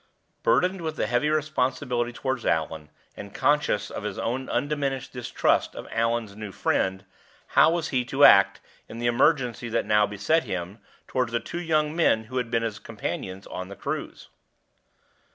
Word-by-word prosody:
Burdened 190 Hz, -, +2 dB
with 160 Hz, -1 st, -4 dB
his -, -, -1 dB
heavy 125 Hz, +5 st, +2 dB
responsibility 130 Hz, -5 st, 0 dB
toward 130 Hz, 0 st, -3 dB
Allan, 80 Hz, -1 st, -1 dB, 0.3 s
and 100 Hz, -1 st, -10 dB
conscious 150 Hz, -7 st, +1 dB
of -, -, -5 dB
his -, -, -4 dB
own 130 Hz, +3 st, -2 dB
undiminished 140 Hz, 0 st, -2 dB
distrust 125 Hz, -2 st, 0 dB
of -, -, -8 dB
Allan's 115 Hz, -2 st, -1 dB
new 105 Hz, -1 st, -7 dB
friend, 95 Hz, 0 st, 0 dB, 0.4 s
how -, -, +6 dB
was 170 Hz, -1 st, -1 dB
he 130 Hz, -2 st, +1 dB
to 135 Hz, +3 st, +1 dB
act, 100 Hz, 0 st, +6 dB, 0.3 s
in 115 Hz, -, -8 dB
the 120 Hz, -, -3 dB
emergency 120 Hz, -1 st, +2 dB
that -, -, 0 dB
now 105 Hz, -1 st, +3 dB
beset 105 Hz, +11 st, +1 dB
him, 95 Hz, 0 st, -5 dB, 0.3 s
toward 125 Hz, -2 st, 0 dB
the 115 Hz, 0 st, 0 dB
two 175 Hz, -, -6 dB
young 155 Hz, -2 st, +1 dB
men 160 Hz, -10 st, +3 dB
who 130 Hz, +4 st, -6 dB
had 125 Hz, -2 st, -1 dB
been 115 Hz, -1 st, 0 dB
his 110 Hz, -3 st, -3 dB
companions 95 Hz, -3 st, -5 dB
on 95 Hz, 0 st, -6 dB
the 100 Hz, -, -9 dB
cruise? -, -, -5 dB
120 Hz, 170 wpm, -26 LUFS, 105-145 Hz, 0.4 s, how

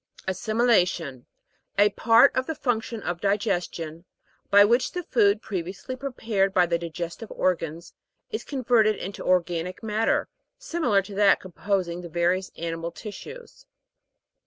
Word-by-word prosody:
ASSIMJLA'TION. 185 Hz, -, +1 dB, 0.5 s
A 205 Hz, +1 st, +5 dB
part 230 Hz, +5 st, +5 dB
of 260 Hz, 0 st, 0 dB
the 320 Hz, -, -3 dB
func 245 Hz, -6 st, 0 dB
tion 225 Hz, -2 st, -7 dB
of 175 Hz, -1 st, -3 dB
digestion, 180 Hz, -5 st, -1 dB, 0.4 s
by 205 Hz, 0 st, +7 dB
which 240 Hz, +4 st, +2 dB
the 360 Hz, 0 st, -3 dB
food, 215 Hz, -8 st, +2 dB
previously 190 Hz, +6 st, -5 dB
prepared 225 Hz, -7 st, -1 dB
by 180 Hz, -, +5 dB
the 170 Hz, -1 st, 0 dB
digestive 170 Hz, +5 st, -6 dB
organs, 165 Hz, -2 st, -2 dB, 0.4 s
is 440 Hz, -, -3 dB
converted 235 Hz, -6 st, +2 dB
into 195 Hz, +1 st, -6 dB
organic 180 Hz, +1 st, 0 dB
matter, 220 Hz, +1 st, +1 dB, 0.3 s
similar 245 Hz, -13 st, +1 dB
to 200 Hz, -, -10 dB
that 200 Hz, 0 st, +4 dB
composing 185 Hz, -1 st, -2 dB
the 175 Hz, -, -8 dB
various 175 Hz, +3 st, 0 dB
animal 165 Hz, 0 st, -3 dB
tis 205 Hz, +4 st, -8 dB
sues. -, -, -12 dB
200 Hz, 135 wpm, -25 LUFS, 175-230 Hz, 0.5 s, by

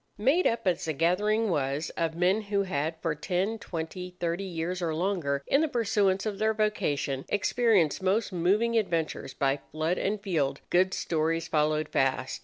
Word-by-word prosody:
Made 270 Hz, -, +3 dB
up 230 Hz, -1 st, -1 dB
as 180 Hz, -2 st, +1 dB
the 160 Hz, -, -1 dB
gathering 205 Hz, +8 st, +2 dB
was 145 Hz, 0 st, -1 dB
of 165 Hz, -1 st, -2 dB
men 185 Hz, +5 st, +2 dB
who 200 Hz, -1 st, 0 dB
had 160 Hz, -3 st, -2 dB
for 165 Hz, -3 st, +1 dB
ten, 190 Hz, +8 st, -2 dB
twenty, 180 Hz, +1 st, -6 dB
thirty 170 Hz, +2 st, -1 dB
years 180 Hz, 0 st, -3 dB
or 165 Hz, -2 st, -1 dB
longer, 160 Hz, -6 st, -1 dB
in 275 Hz, -, +3 dB
the 320 Hz, -, +2 dB
pursuance 205 Hz, -6 st, +1 dB
of 210 Hz, -2 st, -3 dB
their 220 Hz, 0 st, +2 dB
vocation, 145 Hz, -10 st, -1 dB
experienced 205 Hz, -, +2 dB
most 195 Hz, +2 st, +1 dB
moving 205 Hz, +7 st, +2 dB
adventures 165 Hz, -8 st, -2 dB
by 135 Hz, +1 st, +1 dB
flood 160 Hz, +3 st, -1 dB
and 210 Hz, +2 st, -1 dB
field, 160 Hz, -9 st, -1 dB
good 185 Hz, +1 st, +3 dB
stories 165 Hz, 0 st, -1 dB
followed 155 Hz, 0 st, +1 dB
fast. 130 Hz, -1 st, 0 dB
180 Hz, 170 wpm, -28 LUFS, 155-205 Hz, -, Made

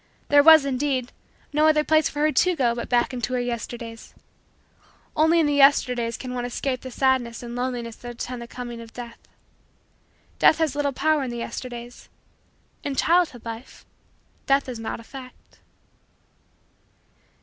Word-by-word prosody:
There 290 Hz, 0 st, +7 dB
was, 315 Hz, -1 st, +8 dB
indeed, 260 Hz, -2 st, -1 dB, 0.4 s
no 305 Hz, +1 st, +4 dB
other 305 Hz, -1 st, +4 dB
place 315 Hz, 0 st, +3 dB
for 295 Hz, -, -4 dB
her 305 Hz, 0 st, +3 dB
to 360 Hz, +6 st, +2 dB
go 245 Hz, -6 st, +2 dB
but 235 Hz, 0 st, -5 dB
back 245 Hz, +1 st, +2 dB
into 250 Hz, 0 st, -3 dB
her 250 Hz, -, +1 dB
Yesterdays. 235 Hz, -1 st, -6 dB, 1.0 s
Only 320 Hz, +2 st, +4 dB
in 325 Hz, -, +3 dB
the 290 Hz, -, +1 dB
Yesterdays 250 Hz, -4 st, +3 dB
can 255 Hz, -1 st, -6 dB
one 245 Hz, -1 st, -3 dB
escape 255 Hz, +1 st, -3 dB
the 260 Hz, -, -7 dB
sadness 250 Hz, -2 st, 0 dB
and 240 Hz, 0 st, -7 dB
loneliness 245 Hz, -2 st, -3 dB
that 240 Hz, 0 st, -8 dB
attend 245 Hz, +1 st, -6 dB
the 235 Hz, -, -8 dB
coming 240 Hz, -1 st, -7 dB
of 230 Hz, -1 st, -12 dB
Death. 235 Hz, -1 st, -9 dB, 1.2 s
Death -, -, +6 dB
has 315 Hz, -4 st, 0 dB
little 290 Hz, -1 st, 0 dB
power 310 Hz, +3 st, +1 dB
in 265 Hz, -, -3 dB
the 240 Hz, -, -5 dB
Yesterdays. 240 Hz, 0 st, -7 dB, 0.7 s
In 280 Hz, -, -3 dB
childhood 325 Hz, -7 st, +2 dB
life, 230 Hz, +2 st, -9 dB, 0.6 s
Death 275 Hz, 0 st, +3 dB
is 245 Hz, -3 st, -6 dB
not 225 Hz, 0 st, -5 dB
a -, -, -11 dB
fact. 255 Hz, +1 st, -13 dB
255 Hz, 160 wpm, -24 LUFS, 240-285 Hz, 1.2 s, was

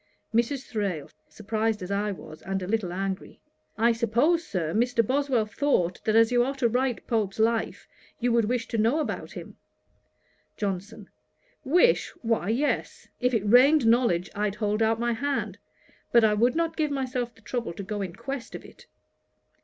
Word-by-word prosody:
MRS. 240 Hz, +4 st, 0 dB
THRALE: 195 Hz, -9 st, -3 dB, 0.2 s
(surprized 215 Hz, -1 st, -2 dB
as 180 Hz, -, -6 dB
I 205 Hz, +1 st, 0 dB
was, 155 Hz, -5 st, -10 dB
and 195 Hz, -1 st, -3 dB
a -, -, -5 dB
little 205 Hz, -4 st, -1 dB
angry.) 190 Hz, +1 st, -4 dB, 0.4 s
'I 230 Hz, +2 st, +4 dB
suppose, 240 Hz, +9 st, +2 dB
Sir, 165 Hz, -, -3 dB
Mr. 235 Hz, +1 st, +2 dB
Boswell 265 Hz, -2 st, +1 dB
thought, 210 Hz, -6 st, 0 dB
that 215 Hz, -, +2 dB
as 225 Hz, +1 st, +5 dB
you 245 Hz, -1 st, +4 dB
are 270 Hz, +3 st, -2 dB
to 265 Hz, -3 st, +2 dB
write 250 Hz, +1 st, -1 dB
Pope's 215 Hz, -4 st, -1 dB
Life, 225 Hz, +1 st, 0 dB, 0.3 s
you 245 Hz, -1 st, +1 dB
would 230 Hz, -1 st, +3 dB
wish 230 Hz, +1 st, -1 dB
to 230 Hz, -, -1 dB
know 230 Hz, +8 st, +2 dB
about 305 Hz, -, -4 dB
him.' -, -, -10 dB, 1.0 s
JOHNSON. 200 Hz, +1 st, -4 dB, 0.6 s
'Wish! 360 Hz, -, +3 dB
why 225 Hz, -4 st, 0 dB
yes. 265 Hz, +7 st, -1 dB
If 250 Hz, 0 st, +1 dB
it 210 Hz, -2 st, 0 dB
rained 260 Hz, +5 st, +6 dB
knowledge 225 Hz, -7 st, +2 dB
I'd 205 Hz, 0 st, -1 dB
hold 210 Hz, 0 st, -1 dB
out 225 Hz, 0 st, +2 dB
my 240 Hz, 0 st, +1 dB
hand; 280 Hz, +4 st, -2 dB, 0.5 s
but 235 Hz, -1 st, +6 dB
I 215 Hz, -1 st, +4 dB
would 235 Hz, +4 st, +2 dB
not 330 Hz, -1 st, 0 dB
give 310 Hz, -2 st, 0 dB
myself 255 Hz, -3 st, -3 dB
the -, -, -21 dB
trouble 235 Hz, -3 st, -4 dB
to 200 Hz, -, -7 dB
go 205 Hz, +1 st, -4 dB
in 185 Hz, -3 st, -5 dB
quest 270 Hz, -3 st, -6 dB
of -, -, -9 dB
it.' -, -, -16 dB
225 Hz, 175 wpm, -26 LUFS, 205-250 Hz, 1.0 s, rained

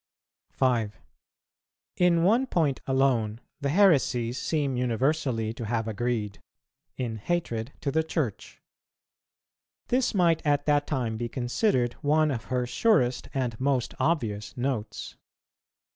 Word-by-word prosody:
5. 115 Hz, -5 st, 0 dB, 1.0 s
In 175 Hz, -2 st, +4 dB
one 235 Hz, +8 st, +3 dB
point 155 Hz, -, +1 dB
alone 125 Hz, -5 st, +1 dB, 0.2 s
the 140 Hz, -, -1 dB
heresies 135 Hz, -, +3 dB
seem 145 Hz, -5 st, 0 dB
universally 125 Hz, -2 st, 0 dB
to 115 Hz, 0 st, -6 dB
have 115 Hz, 0 st, -1 dB
agreed, 110 Hz, -2 st, -2 dB, 0.6 s
in 120 Hz, -4 st, -3 dB
hatred 120 Hz, -3 st, -2 dB
to 140 Hz, -, -1 dB
the 160 Hz, -, +2 dB
Church. 150 Hz, -, -3 dB, 1.3 s
This 250 Hz, -3 st, +1 dB
might 170 Hz, -4 st, +3 dB
at 145 Hz, -1 st, +1 dB
that 145 Hz, -1 st, +2 dB
time 120 Hz, -6 st, -1 dB
be 120 Hz, +1 st, -3 dB
considered 120 Hz, -, 0 dB
one 155 Hz, +1 st, +3 dB
of 115 Hz, -4 st, -4 dB
her 125 Hz, -1 st, -1 dB
surest 125 Hz, -, +1 dB
and 125 Hz, -4 st, -2 dB
most 130 Hz, -2 st, 0 dB
obvious 110 Hz, -12 st, -1 dB
Notes. 120 Hz, -5 st, -3 dB
130 Hz, 120 wpm, -27 LUFS, 115-155 Hz, 1.3 s, In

